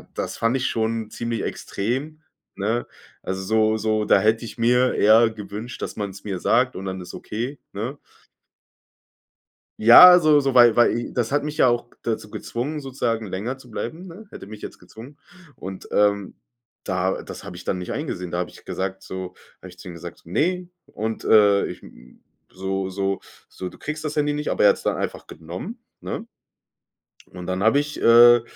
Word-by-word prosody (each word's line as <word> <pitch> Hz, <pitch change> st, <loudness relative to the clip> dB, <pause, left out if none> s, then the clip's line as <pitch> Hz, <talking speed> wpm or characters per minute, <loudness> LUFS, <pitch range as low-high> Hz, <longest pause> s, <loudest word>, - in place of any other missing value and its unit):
das -, -, -4 dB
fand 115 Hz, +2 st, +1 dB
ich 130 Hz, -, -1 dB
schon 110 Hz, -1 st, -1 dB
ziemlich 115 Hz, -1 st, -3 dB
extrem, 135 Hz, +10 st, -4 dB, 0.3 s
ne? 110 Hz, +4 st, -1 dB, 0.4 s
Also, 95 Hz, 0 st, -3 dB
so 110 Hz, +1 st, +2 dB
so 110 Hz, -1 st, 0 dB
da -, -, +5 dB
hätte 110 Hz, +2 st, +2 dB
ich 115 Hz, -, -9 dB
mir 125 Hz, +2 st, +3 dB
eher 110 Hz, +2 st, +5 dB
gewünscht, 105 Hz, +3 st, -8 dB
dass -, -, -5 dB
man 100 Hz, -2 st, -3 dB
es 100 Hz, +1 st, -13 dB
mir 95 Hz, -3 st, -4 dB
sagt 125 Hz, +7 st, +2 dB
und 95 Hz, -, -6 dB
dann 95 Hz, -1 st, -4 dB
ist 90 Hz, -, -10 dB
es -, -, -9 dB
okay, 120 Hz, +7 st, -5 dB
ne? 115 Hz, +8 st, -4 dB, 1.8 s
Ja, 180 Hz, +11 st, +10 dB
so 155 Hz, -2 st, +5 dB
so, 135 Hz, -2 st, 0 dB
weil 120 Hz, -2 st, +7 dB
weil 120 Hz, 0 st, +2 dB
das 120 Hz, +1 st, -1 dB
hat 145 Hz, -, +2 dB
mich 150 Hz, 0 st, -5 dB
ja -, -, +5 dB
auch 120 Hz, 0 st, +1 dB, 0.2 s
dazu 110 Hz, -2 st, -3 dB
gezwungen, 140 Hz, +10 st, -4 dB
sozusagen 120 Hz, -5 st, -2 dB
länger 105 Hz, +8 st, -4 dB
zu 125 Hz, -3 st, -16 dB
bleiben, 160 Hz, -, -5 dB
ne? 185 Hz, +6 st, -11 dB
Hätte -, -, -10 dB
mich 105 Hz, +1 st, -11 dB
jetzt -, -, -8 dB
gezwungen. 125 Hz, +6 st, -13 dB, 0.4 s
Und, 95 Hz, 0 st, -8 dB
ähm, 100 Hz, -1 st, +1 dB, 0.5 s
da 95 Hz, 0 st, -1 dB
das -, -, -9 dB
habe -, -, -9 dB
ich -, -, -11 dB
dann 90 Hz, -, -1 dB
nicht 90 Hz, -, -6 dB
eingesehen. 90 Hz, -, -4 dB
Da 85 Hz, -, -3 dB
habe 90 Hz, -, -2 dB
ich -, -, -17 dB
gesagt 95 Hz, 0 st, -4 dB
so, 95 Hz, -1 st, -7 dB, 0.2 s
habe 95 Hz, -, -12 dB
ich 90 Hz, 0 st, -15 dB
zu 90 Hz, -, -10 dB
ihm 85 Hz, -, -8 dB
gesagt: 85 Hz, -, -10 dB
„Ne“. 180 Hz, -, 0 dB, 0.2 s
Und, 110 Hz, +1 st, -5 dB
äh, 100 Hz, -2 st, +5 dB
ich, -, -, -8 dB
m -, -, -17 dB, 0.3 s
so 95 Hz, 0 st, -3 dB
so 95 Hz, 0 st, -2 dB, 0.3 s
so: 90 Hz, -, -7 dB
„Du -, -, -15 dB
kriegst 155 Hz, +1 st, -5 dB
das 150 Hz, -, -3 dB
Handy 150 Hz, 0 st, +1 dB
nicht“, 150 Hz, 0 st, -3 dB
aber -, -, 0 dB
er -, -, +8 dB
hat's -, -, -1 dB
dann -, -, 0 dB
einfach -, -, -4 dB
genommen, 235 Hz, +2 st, -8 dB, 0.2 s
ne? -, -, -5 dB, 1.1 s
Und 90 Hz, -1 st, -8 dB
dann 95 Hz, +1 st, -2 dB
habe 110 Hz, +7 st, +4 dB
ich, 145 Hz, +1 st, -3 dB
äh, 120 Hz, 0 st, +7 dB
110 Hz, 195 wpm, -23 LUFS, 95-130 Hz, 1.8 s, Ja